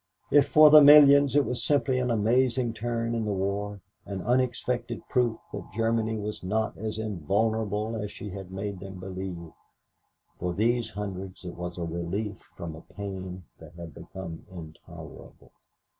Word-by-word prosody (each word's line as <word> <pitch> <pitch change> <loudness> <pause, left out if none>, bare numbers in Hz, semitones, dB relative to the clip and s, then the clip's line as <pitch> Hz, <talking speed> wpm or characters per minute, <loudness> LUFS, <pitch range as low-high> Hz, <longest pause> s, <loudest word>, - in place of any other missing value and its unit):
If 145 -1 +5
for 155 -1 +7
the 155 0 +10
millions 140 -1 +8
it 145 -2 +4
was 125 - -1
simply 140 -3 +2
an 125 0 -1
amazing 120 +2 +2
turn 115 0 -2
in 115 -1 -1
the 105 - -1
war, 100 +1 -2 0.3
an 95 -2 -5
unexpected 120 -1 -1
proof 120 -4 +1 0.2
that - - -7
Germany 115 0 0
was 105 -1 -5
not 110 +4 -1
as 110 0 -4
invulnerable 110 +2 -1
as 105 -2 -4
she 105 - -8
had 95 -1 -8
made 100 0 -5
them 95 -1 -9
believe, 95 -3 -6 0.9
for 90 -1 -2
these 120 +4 +1
hundreds 95 -2 -7
it 90 - -6
was 90 0 -6
a 85 - -3
relief 85 +5 -4 0.2
from 80 -2 -7
a 80 - -11
pain 95 -2 -7 0.2
that - - -14
had 85 -2 -9
become 85 -4 -9
intolerable. 80 -4 -12
105 Hz, 160 wpm, -27 LUFS, 95-120 Hz, 0.9 s, the